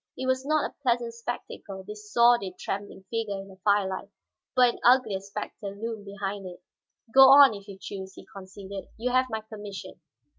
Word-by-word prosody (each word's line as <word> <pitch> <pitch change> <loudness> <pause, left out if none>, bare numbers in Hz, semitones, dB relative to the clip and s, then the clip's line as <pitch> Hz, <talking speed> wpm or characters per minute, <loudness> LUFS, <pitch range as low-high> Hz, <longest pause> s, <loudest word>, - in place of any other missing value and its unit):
It 260 - -3
was 260 +1 0
not 310 0 +2
a - - -17
pleasant 240 -3 0
spectacle, 230 -4 -7
this 210 0 -10
sordid, 235 -6 +4
trembling 195 -1 -5
figure 220 -4 -2
in 195 0 -9
the 190 - -14
firelight, 200 -1 +1 0.5
but 250 -2 +5
an - - -12
uglier 245 -5 +4
specter 200 0 -7
loomed 225 -2 -5
behind 200 -1 -5
it. 180 0 -11 0.5
"Go 265 0 +9
on, 275 -3 +9
if 200 -1 -10
you 200 -2 -9
choose," 190 -1 -7
he - - -12
conceded. 195 0 -8
"You 245 +3 -1
have 255 +1 +2
my 220 -1 -3
permission." 210 -2 -9
210 Hz, 180 wpm, -27 LUFS, 195-240 Hz, 0.5 s, Go